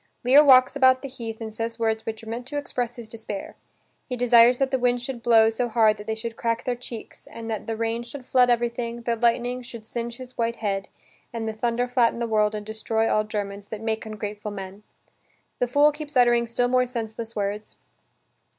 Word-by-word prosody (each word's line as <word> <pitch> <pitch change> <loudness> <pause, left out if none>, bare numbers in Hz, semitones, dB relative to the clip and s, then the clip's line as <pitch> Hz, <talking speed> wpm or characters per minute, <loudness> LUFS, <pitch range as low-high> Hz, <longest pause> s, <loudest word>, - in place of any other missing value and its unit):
Lear 270 +5 +7
walks 255 -2 +6
about 260 -1 +4
the - - -3
heath 230 -4 -7
and 220 -1 -6
says 230 +1 -4
words 220 -1 -1
which 220 0 -5
are - - -11
meant 240 +2 -5
to 290 - -4
express 245 -4 -2
his 235 -2 -8
despair: 220 -3 -7 0.6
he 250 - -2
desires 245 0 +6
that 270 0 0
the 265 - +1
winds 245 0 +1
should 255 -2 -5
blow 225 -1 +5
so 240 +2 -2
hard 220 -2 +4
that 210 +1 -10
they 220 - -1
should 225 +1 -6
crack 230 0 -1
their 250 - -1
cheeks 240 -2 -10
and 230 0 -7
that 215 - -4
the 225 -1 -3
rain 230 +1 -1
should 245 +2 -9
flood 250 -1 +4
everything, 235 0 -1
that 235 -1 -2
lightning 245 +1 +1
should 235 -2 -10
singe 235 +1 -5
his 255 -1 -11
white 235 0 -1
head, 195 -3 -2 0.4
and 230 -1 -4
the 220 - -2
thunder 235 +2 -1
flatten 245 -2 +2
the 235 - -1
world 215 -1 +1
and 210 -1 -5
destroy 220 +1 -1
all 215 - +2
germens 205 -1 -5
"that 220 - -5
make 220 0 -2
ungrateful 210 -1 -6
man!" 195 0 -8 0.8
The 245 - +1
fool 290 +4 +4
keeps 300 -2 -6
uttering 240 -1 +4
still 245 +1 +1
more 250 0 +2
senseless 230 -1 -5
words. 205 +1 -3
230 Hz, 215 wpm, -25 LUFS, 220-245 Hz, 0.8 s, Lear